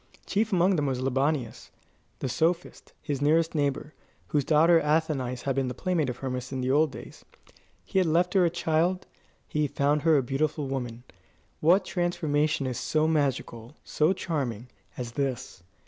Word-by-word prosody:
Chief 220 Hz, +2 st, 0 dB
among 185 Hz, 0 st, +3 dB
them 145 Hz, -2 st, 0 dB
was 130 Hz, -2 st, -1 dB
Libanius, 135 Hz, -1 st, -1 dB, 0.5 s
the -, -, -3 dB
sophist, 165 Hz, +7 st, -1 dB
his 145 Hz, -3 st, -3 dB
nearest 160 Hz, +3 st, +2 dB
neighbour, 145 Hz, 0 st, -1 dB, 0.4 s
whose 145 Hz, -2 st, +1 dB
daughter 165 Hz, +4 st, +5 dB
Athenais 150 Hz, -5 st, 0 dB
had 135 Hz, -2 st, -1 dB
been 135 Hz, -1 st, 0 dB
the 125 Hz, -, -4 dB
playmate 165 Hz, -3 st, 0 dB
of 125 Hz, -, -5 dB
Hermas 130 Hz, -1 st, -4 dB
in 130 Hz, -1 st, -3 dB
the 130 Hz, +1 st, 0 dB
old 150 Hz, +1 st, +3 dB
days. -, -, -11 dB, 0.6 s
He 190 Hz, -, 0 dB
had 185 Hz, -, +2 dB
left 175 Hz, +3 st, +2 dB
her 190 Hz, -2 st, +4 dB
a 170 Hz, -, +3 dB
child. 170 Hz, +2 st, 0 dB, 0.4 s
He 150 Hz, -1 st, 0 dB
found 145 Hz, +2 st, +1 dB
her 160 Hz, -1 st, +4 dB
a 135 Hz, -, +1 dB
beautiful 145 Hz, +3 st, -1 dB
woman. 125 Hz, -3 st, -4 dB, 0.6 s
What 185 Hz, +5 st, +4 dB
transformation 155 Hz, -5 st, 0 dB
is 125 Hz, -2 st, -3 dB
so 155 Hz, 0 st, +1 dB
magical, 135 Hz, -5 st, -1 dB
so 155 Hz, +3 st, +1 dB
charming, 130 Hz, -, -3 dB, 0.3 s
as 120 Hz, -2 st, -5 dB
this? 130 Hz, -7 st, -3 dB
150 Hz, 165 wpm, -27 LUFS, 130-165 Hz, 0.6 s, daughter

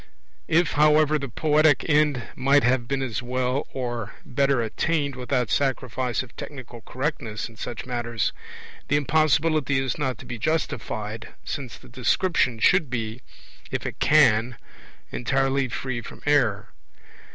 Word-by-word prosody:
If, 165 Hz, +1 st, +3 dB
however, 150 Hz, 0 st, +4 dB
the 140 Hz, -2 st, -5 dB
poetic 150 Hz, +3 st, +3 dB
end 150 Hz, -5 st, +3 dB
might 140 Hz, +2 st, +3 dB
have 120 Hz, -1 st, +2 dB
been 135 Hz, 0 st, -1 dB
as 120 Hz, -4 st, -3 dB
well 125 Hz, +2 st, -1 dB
or 120 Hz, -5 st, -4 dB
better 135 Hz, 0 st, +1 dB
attained 140 Hz, +6 st, -1 dB
without 125 Hz, -2 st, -1 dB
sacrifice 130 Hz, -2 st, 0 dB
of 130 Hz, -, -15 dB
technical 125 Hz, -5 st, -9 dB
correctness 125 Hz, -4 st, -3 dB
in 115 Hz, -, -16 dB
such 115 Hz, 0 st, -6 dB
matters, 120 Hz, -3 st, -2 dB, 0.5 s
the 145 Hz, -, +2 dB
impossibility 155 Hz, -1 st, +2 dB
is 135 Hz, +3 st, -1 dB
not 130 Hz, -4 st, -1 dB
to -, -, -11 dB
be 120 Hz, -2 st, -6 dB
justified, 110 Hz, -7 st, -3 dB
since 130 Hz, -5 st, -5 dB
the -, -, -16 dB
description 125 Hz, +1 st, +1 dB
should 160 Hz, -, +3 dB
be, 115 Hz, -1 st, -4 dB, 0.5 s
if -, -, -3 dB
it -, -, -5 dB
can, 125 Hz, -6 st, +4 dB, 0.5 s
entirely 135 Hz, +1 st, +1 dB
free 125 Hz, 0 st, -4 dB
from -, -, -11 dB
error. 120 Hz, -8 st, +2 dB
130 Hz, 140 wpm, -25 LUFS, 120-145 Hz, 0.5 s, however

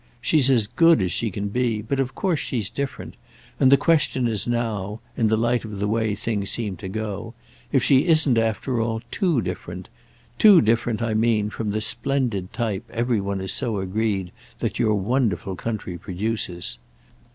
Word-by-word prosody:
She's 135 Hz, +2 st, +3 dB
as 120 Hz, -5 st, +4 dB
good 165 Hz, +7 st, +4 dB
as 90 Hz, -3 st, 0 dB
she 115 Hz, -, -1 dB
can 100 Hz, +1 st, -4 dB
be, 120 Hz, 0 st, 0 dB
but 135 Hz, +5 st, -2 dB
of 135 Hz, -1 st, -1 dB
course 180 Hz, -6 st, 0 dB
she's 115 Hz, -4 st, -3 dB
different, 140 Hz, +3 st, -5 dB, 0.4 s
and 130 Hz, -1 st, +5 dB
the 140 Hz, -, +8 dB
question 145 Hz, -5 st, +2 dB
is 110 Hz, -2 st, -1 dB
now—in 115 Hz, 0 st, -2 dB
the 110 Hz, 0 st, +2 dB
light 120 Hz, +2 st, +1 dB
of 105 Hz, -3 st, -7 dB
the 100 Hz, +1 st, -1 dB
way 110 Hz, -1 st, 0 dB
things 100 Hz, -2 st, -2 dB
seem 105 Hz, -5 st, -2 dB
to 95 Hz, -, -7 dB
go—if 110 Hz, +5 st, -4 dB
she 140 Hz, +4 st, +4 dB
isn't 155 Hz, -6 st, +4 dB
after 115 Hz, +2 st, 0 dB
all 115 Hz, 0 st, -2 dB
too 170 Hz, -, +1 dB
different: 90 Hz, 0 st, -6 dB, 0.5 s
too 205 Hz, -5 st, +8 dB
different 115 Hz, +1 st, +1 dB
I 115 Hz, -2 st, 0 dB
mean 110 Hz, -1 st, +1 dB
from 110 Hz, 0 st, -3 dB
the 110 Hz, +1 st, -1 dB
splendid 115 Hz, -4 st, -1 dB
type 110 Hz, -6 st, -3 dB
every 120 Hz, -2 st, 0 dB
one 100 Hz, 0 st, -3 dB
is 95 Hz, 0 st, -2 dB
so 115 Hz, -3 st, -1 dB
agreed 95 Hz, -1 st, -1 dB, 0.3 s
that -, -, -3 dB
your 110 Hz, -2 st, +3 dB
wonderful 100 Hz, -, 0 dB
country 95 Hz, -4 st, -5 dB
produces. 90 Hz, -, -3 dB
115 Hz, 175 wpm, -23 LUFS, 100-120 Hz, 0.5 s, the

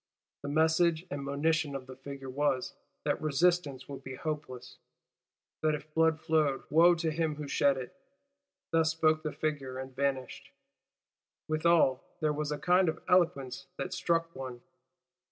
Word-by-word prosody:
The 145 Hz, -, -5 dB
message 160 Hz, +2 st, +3 dB
and 140 Hz, 0 st, -3 dB
monition 145 Hz, +1 st, 0 dB
of 135 Hz, -1 st, -5 dB
the 130 Hz, 0 st, -10 dB
figure 135 Hz, 0 st, -8 dB
was, 135 Hz, -1 st, 0 dB, 0.3 s
that -, -, 0 dB
resistance 155 Hz, -3 st, +1 dB
would 135 Hz, -1 st, -8 dB
be 130 Hz, 0 st, -7 dB
hopeless; 150 Hz, -4 st, -6 dB, 0.8 s
that 155 Hz, -1 st, +2 dB
if 150 Hz, +1 st, -10 dB
blood 160 Hz, 0 st, +3 dB
flowed, 155 Hz, -4 st, +1 dB
wo 170 Hz, +3 st, +6 dB
to 165 Hz, -1 st, -1 dB
him 160 Hz, -1 st, -1 dB
who 150 Hz, -1 st, -6 dB
shed 140 Hz, 0 st, +3 dB
it. 125 Hz, -1 st, -7 dB, 0.8 s
Thus 165 Hz, -1 st, +3 dB
spoke 160 Hz, -1 st, +2 dB
the 155 Hz, -, -3 dB
figure; 140 Hz, -5 st, -3 dB
and 130 Hz, 0 st, -7 dB
vanished. 135 Hz, -2 st, -2 dB, 1.0 s
"Withal 155 Hz, -4 st, +3 dB, 0.2 s
there 155 Hz, -1 st, +1 dB
was 150 Hz, 0 st, -2 dB
a 150 Hz, -, -1 dB
kind 180 Hz, +2 st, +3 dB
of 160 Hz, -, -5 dB
eloquence 135 Hz, -7 st, +1 dB
that 185 Hz, -, -4 dB
struck 165 Hz, -1 st, 0 dB
one." 130 Hz, -2 st, -7 dB
150 Hz, 155 wpm, -31 LUFS, 135-160 Hz, 1.0 s, wo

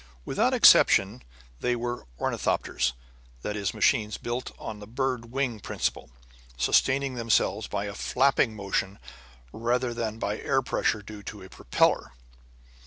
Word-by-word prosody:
Without -, -, +1 dB
exception 65 Hz, -, +6 dB, 0.4 s
they 125 Hz, 0 st, 0 dB
were 120 Hz, -, -4 dB
ornithopters; -, -, 0 dB, 0.5 s
that 105 Hz, -, -3 dB
is, 100 Hz, -3 st, -1 dB
machines 105 Hz, -1 st, +1 dB
built 120 Hz, +1 st, -4 dB
on 105 Hz, -1 st, -7 dB
the 105 Hz, -, -10 dB
bird 125 Hz, 0 st, -2 dB
wing 130 Hz, -4 st, -1 dB
principle, 65 Hz, -, -3 dB, 0.5 s
sustaining 130 Hz, -, +2 dB
themselves 115 Hz, -3 st, +1 dB
by 100 Hz, 0 st, -3 dB
a 100 Hz, -, -5 dB
flapping 125 Hz, +1 st, +2 dB
motion 100 Hz, -1 st, -2 dB, 0.6 s
rather 120 Hz, +2 st, 0 dB
than 115 Hz, -2 st, -3 dB
by 105 Hz, -1 st, -2 dB
air 135 Hz, -, +1 dB
pressure 110 Hz, -3 st, 0 dB
due 105 Hz, 0 st, -9 dB
to 100 Hz, 0 st, -9 dB
a 95 Hz, -, -12 dB
propeller. 65 Hz, -, +1 dB
110 Hz, 135 wpm, -27 LUFS, 105-125 Hz, 0.6 s, exception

